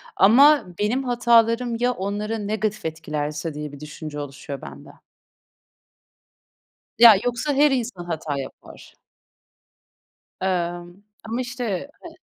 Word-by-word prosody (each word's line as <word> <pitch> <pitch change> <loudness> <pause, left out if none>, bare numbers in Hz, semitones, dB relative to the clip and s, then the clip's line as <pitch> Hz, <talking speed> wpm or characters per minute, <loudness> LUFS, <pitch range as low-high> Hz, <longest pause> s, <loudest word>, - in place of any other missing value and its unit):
ama 280 +9 +6
benim 240 +6 0
hatalarım 235 -1 +2
ya 245 +1 +2
onları 210 +1 -3
negatif 215 -2 -2
etkilerse 155 -1 -4
diye 150 -1 -6
bir 145 - -11
düşünce 150 0 -8
oluşuyor 140 -1 -7
bende. - - -11 2.1
Ya, 235 -2 +10
yoksa 245 +4 -1
her 290 +1 +4
insan 235 -9 -3
hata 155 -4 -4
yapar. 135 - -11 1.5
Emm, 175 0 -3 0.2
ama 230 +3 -3
işte 245 -2 -4
he 345 - -9
210 Hz, 110 wpm, -23 LUFS, 160-245 Hz, 2.1 s, Ya